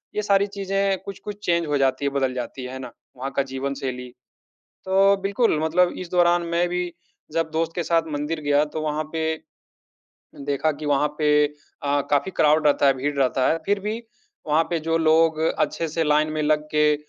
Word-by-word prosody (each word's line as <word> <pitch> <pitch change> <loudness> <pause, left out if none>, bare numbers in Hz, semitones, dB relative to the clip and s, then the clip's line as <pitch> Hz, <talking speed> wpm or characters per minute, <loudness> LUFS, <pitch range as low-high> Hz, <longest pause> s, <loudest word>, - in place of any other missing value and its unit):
ये 210 - +1
सारी 200 -1 +3
चीज़ें 195 -1 -1
कुछ-कुछ 200 +1 -7
चेन्ज 170 -2 +1
हो 145 - +1
जाती 135 0 +1
हैं, 140 - -1
बदल 135 -2 0
जाती 125 +1 -5
हैं। 125 - -6
है 130 - -6
ना? 130 - -8 0.3
वहाँ 135 +2 -4
का 140 - +3
जीवनशैली। 130 -2 -4 0.8
तो 195 +1 +4
बिल्कुल, 200 -3 +1
मतलब 175 +3 +2
इस 180 -2 -7
दौरान 175 -1 +3
मैं 175 +1 +2
भी 180 0 -2 0.4
जब 165 0 0
दोस्त 165 +1 -1
के 175 - -1
साथ 165 0 +2
मंदिर 150 +2 -2
गया, 145 0 +2
तो 155 +1 -6
वहाँ 155 0 -1
पे 160 -1 -2 1.2
देखा 145 +2 +1
कि 150 +1 -7
वहाँ 145 +1 +2
पे 150 -1 +2 0.2
अ, 145 -1 -3
काफ़ी 145 +6 +2
क्राउड 155 0 +4
रहता 145 -1 +4
है, 135 - +5
भीड़ 145 +3 -2
रहता 130 -1 +2
है। 165 - +2
फिर 200 0 +1
भी 215 +3 -3 0.5
वहाँ 155 +2 +3
पे 170 - +1
जो 165 +1 0
लोग 160 0 +3 0.2
अच्छे 165 - 0
से 165 +1 -1
लाइन 150 +1 +2
में 155 0 -1
लग 150 0 +2
के, 150 0 +4
155 Hz, 195 wpm, -23 LUFS, 145-175 Hz, 1.2 s, है